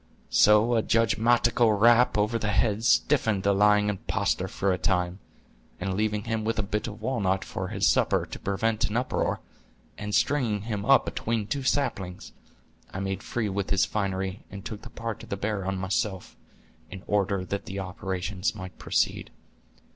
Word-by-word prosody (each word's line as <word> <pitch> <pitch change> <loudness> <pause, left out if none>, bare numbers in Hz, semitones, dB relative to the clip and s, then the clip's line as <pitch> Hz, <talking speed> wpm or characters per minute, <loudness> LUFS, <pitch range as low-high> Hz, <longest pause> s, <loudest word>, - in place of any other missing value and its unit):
So 105 +3 +5
a 115 - +3
judgmatical 115 0 +3
rap 120 +1 +5
over 105 +3 +1
the 105 - -2
head 105 +1 +1
stiffened 115 -6 +2
the 100 - +3
lying 105 +1 +4
impostor 105 -2 -1
for 95 -1 0
a - - -1
time, 90 0 0 0.6
and 95 +1 -2
leaving 105 +1 -1
him 110 -1 -2
a 115 -1 0
bit 105 +2 -2
of 105 -2 -8
walnut 100 -7 0
for - - -4
his - - -1
supper, - - +2
to - - -8
prevent 110 +3 0
an 105 - -1
uproar, 125 - -1 0.6
and 105 0 -2
stringing 120 -8 +1
him 105 -3 -3
up 135 0 +5
atween 115 -2 -2
two 140 +6 -2
saplings, 100 -10 -2 0.6
I 95 - -5
made 95 0 -3
free 115 -3 -2
with 100 -1 -2
his 100 -1 +3
finery, 95 -2 -2
and 100 0 -9
took 105 -2 -6
the - - -10
part 115 -1 -5
of - - -12
the 100 - -3
bear 100 -1 -2
on 95 0 -1
myself, 95 0 -2 0.5
in 95 - -9
order 100 -2 0
that 100 +2 -4
the 95 - -5
operations 95 +1 -3
might 95 -2 -9
proceed." - - 0
105 Hz, 170 wpm, -27 LUFS, 95-115 Hz, 0.6 s, So